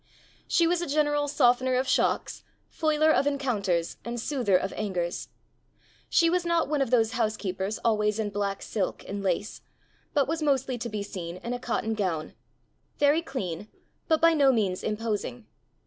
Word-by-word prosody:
She 340 Hz, -, +3 dB
was 345 Hz, +1 st, +1 dB
a 345 Hz, -, -3 dB
general 295 Hz, 0 st, +1 dB
softener 255 Hz, -2 st, +3 dB
of 260 Hz, +1 st, +1 dB
shocks, -, -, 0 dB, 0.3 s
foiler 310 Hz, -1 st, +2 dB
of 280 Hz, -, +2 dB
encounters, 210 Hz, -12 st, 0 dB
and 240 Hz, 0 st, -4 dB
soother 235 Hz, -7 st, +2 dB
of 190 Hz, +1 st, -3 dB
angers. 180 Hz, -4 st, -3 dB, 0.8 s
She 335 Hz, -, +4 dB
was 355 Hz, +1 st, +2 dB
not 340 Hz, -1 st, +1 dB
one 295 Hz, -1 st, 0 dB
of 270 Hz, -, +1 dB
those 225 Hz, -3 st, +3 dB
housekeepers 215 Hz, -4 st, -2 dB
always 210 Hz, -2 st, +2 dB
in 215 Hz, -2 st, -2 dB
black 200 Hz, -1 st, -2 dB
silk 200 Hz, -4 st, -3 dB
and 200 Hz, 0 st, -4 dB
lace, 195 Hz, +2 st, -2 dB, 0.5 s
but 280 Hz, -2 st, +3 dB
was 320 Hz, +1 st, -2 dB
mostly 265 Hz, -4 st, +1 dB
to 235 Hz, -, -4 dB
be 210 Hz, -2 st, -3 dB
seen 175 Hz, -3 st, -6 dB
in 235 Hz, +6 st, -5 dB
a 245 Hz, -, -3 dB
cotton 225 Hz, -2 st, -1 dB
gown 180 Hz, -7 st, -2 dB, 0.6 s
very 290 Hz, +3 st, +4 dB
clean, 205 Hz, -, -5 dB, 0.4 s
but 320 Hz, -1 st, +3 dB
by 330 Hz, 0 st, +5 dB
no 280 Hz, -4 st, +5 dB
means 200 Hz, -7 st, 0 dB
imposing. 210 Hz, -, -3 dB
235 Hz, 165 wpm, -27 LUFS, 200-290 Hz, 0.8 s, by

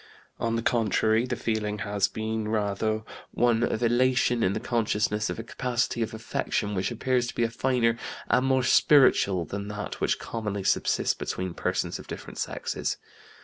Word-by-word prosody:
On 115 Hz, 0 st, 0 dB
the 115 Hz, -, -1 dB
contrary, 110 Hz, 0 st, +2 dB
the 120 Hz, -, -1 dB
feeling 110 Hz, -3 st, -2 dB
has 100 Hz, -1 st, +1 dB
been 110 Hz, 0 st, -3 dB
rather 110 Hz, 0 st, 0 dB, 0.3 s
one 120 Hz, -1 st, +2 dB
of 120 Hz, -1 st, 0 dB
elation 120 Hz, 0 st, +3 dB
in 95 Hz, -, +2 dB
the 110 Hz, -, -2 dB
consciousness 110 Hz, -2 st, 0 dB
of -, -, -3 dB
a 115 Hz, -, -5 dB
capacity 125 Hz, 0 st, -1 dB
of 110 Hz, -, -1 dB
affection 110 Hz, -2 st, -2 dB
which 95 Hz, -1 st, 0 dB
appears 125 Hz, +1 st, 0 dB
to -, -, -6 dB
be 120 Hz, -, +2 dB
finer 115 Hz, 0 st, +1 dB, 0.3 s
and 130 Hz, -, +2 dB
more 130 Hz, -1 st, +3 dB
spiritual 130 Hz, -, +5 dB
than 100 Hz, +5 st, -5 dB
that 105 Hz, 0 st, -6 dB
which -, -, +2 dB
commonly 105 Hz, -3 st, -4 dB
subsists -, -, +2 dB
between 90 Hz, -1 st, -4 dB
persons -, -, -2 dB
of -, -, -11 dB
different -, -, -8 dB
sexes. -, -, -2 dB
115 Hz, 165 wpm, -27 LUFS, 105-120 Hz, 0.3 s, spiritual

